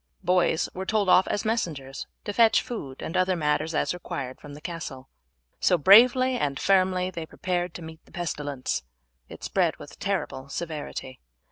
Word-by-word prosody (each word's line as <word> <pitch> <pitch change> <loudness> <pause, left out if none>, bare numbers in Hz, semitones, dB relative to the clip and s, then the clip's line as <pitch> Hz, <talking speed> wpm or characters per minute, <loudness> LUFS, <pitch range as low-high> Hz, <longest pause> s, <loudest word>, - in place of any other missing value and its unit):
Boys 180 -3 +2
were 190 - -4
told 205 -1 +1
off 185 - +6
as 205 - -1
messengers 155 - -2 0.2
to 205 - -3
fetch 225 +1 +5
food 140 - -6
and - - -5
other 185 0 +2
matters 155 0 0
as - - +1
required 135 -7 -6
from 145 -1 -10
the - - -10
castle. 155 -6 -7 0.5
So, 180 - +4
bravely 245 - +6
and 140 -1 -1
firmly, 185 -1 +2
they 165 -3 -6
prepared 180 -1 -2
to 175 - -7
meet 160 0 -10
the - - -22
pestilence; 145 - -3 0.5
it - - -11
spread - - +1
with - - -12
terrible 130 +1 -3
severity. 150 -4 -5
170 Hz, 165 wpm, -26 LUFS, 145-190 Hz, 0.5 s, off